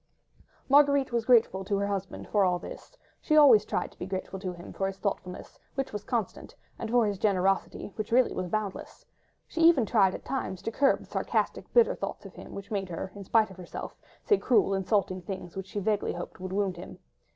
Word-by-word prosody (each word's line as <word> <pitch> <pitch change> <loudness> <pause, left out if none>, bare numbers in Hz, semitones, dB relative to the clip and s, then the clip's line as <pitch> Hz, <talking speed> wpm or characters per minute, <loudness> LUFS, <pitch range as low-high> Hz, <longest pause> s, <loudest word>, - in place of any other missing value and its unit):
Marguerite 280 -1 +4
was 235 -1 0
grateful 225 -6 +4
to 200 +1 -1
her 200 - 0
husband 195 -1 -4
for 205 -2 +2
all 180 -1 +2
this; - - -11 0.2
she 305 - +2
always 255 -9 +7
tried - - -2
to - - -23
be 180 - -5
grateful 190 0 -5
to 185 -1 -4
him 175 0 -11
for 195 - -1
his 195 0 -5
thoughtfulness, 190 -3 -5 0.2
which 270 -4 -3
was 210 -1 -4
constant, 225 -5 -3 0.2
and 225 - -4
for 240 -1 +4
his 205 -2 -2
generosity, 195 0 0
which 215 0 -4
really 250 +1 +4
was 185 - -3
boundless. 205 +1 -4 0.4
She 330 - -3 0.2
tried 205 -3 +4
even 185 - -3
at - - -10
times 225 -9 -4
to 225 - -2
curb 275 +4 +2
the - - -12
sarcastic, - - -2
bitter 475 -2 +5
thoughts - - -6
of - - -10
him, - - -11
which 200 +1 -8
made 195 -3 -2
her—in 190 +4 -6
spite 220 0 +3
of 190 - -13
herself—say 185 - -3
cruel, 230 -5 +3
insulting 190 -1 0
things, 180 -1 -7
which 190 0 -5
she 205 - -4
vaguely 205 +1 0
hoped 175 +1 -7
would 185 0 -6
wound 195 -2 -1
him. 175 - -9
200 Hz, 205 wpm, -28 LUFS, 190-230 Hz, 0.4 s, always